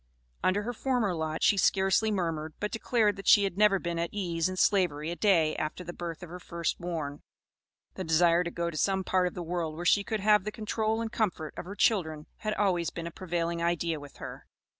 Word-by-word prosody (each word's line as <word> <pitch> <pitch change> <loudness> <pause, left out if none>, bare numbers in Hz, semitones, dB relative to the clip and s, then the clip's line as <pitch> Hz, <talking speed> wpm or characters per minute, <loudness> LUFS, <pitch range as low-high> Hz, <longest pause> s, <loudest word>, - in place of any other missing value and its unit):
Under 200 +3 +2
her 245 +3 -3
former 245 -5 0
lot 160 -1 -3
she 205 - +5
scarcely 195 +3 +3
murmured, 165 -6 -2
but 210 - -2
declared 220 -3 +1
that 195 - -8
she 205 - +7
had 195 -3 -1
never 210 -1 +4
been 170 -2 -3
at 170 - -1
ease 175 -4 -1
in 185 - -5
Slavery 170 -6 +2
a - - -3
day 170 -6 +3
after 155 +4 -3
the 175 0 -7
birth 170 -1 -6
of 175 - -8
her 180 - -7
first 170 -1 -3
born. 160 -5 -4 0.7
The 185 - -5
desire 170 +1 +4
to 170 - -3
go 170 0 -2
to 155 - -7
some 190 +3 +1
part 185 -1 +2
of 180 - -6
the 175 - -4
world 165 -2 -3
where 175 +2 -6
she 200 +3 +4
could 215 0 -3
have 210 -1 +4
the 215 - -3
control 220 +1 -1
and 225 -1 -3
comfort 180 -9 -1
of - - -6
her 200 +3 -7
children, 160 -9 +1
had 215 0 -2
always 180 -5 +1
been 170 - -6
a 170 - -5
prevailing 170 -1 -2
idea 170 -2 0
with 145 -1 -12
her. - - -9
180 Hz, 225 wpm, -29 LUFS, 165-205 Hz, 0.7 s, she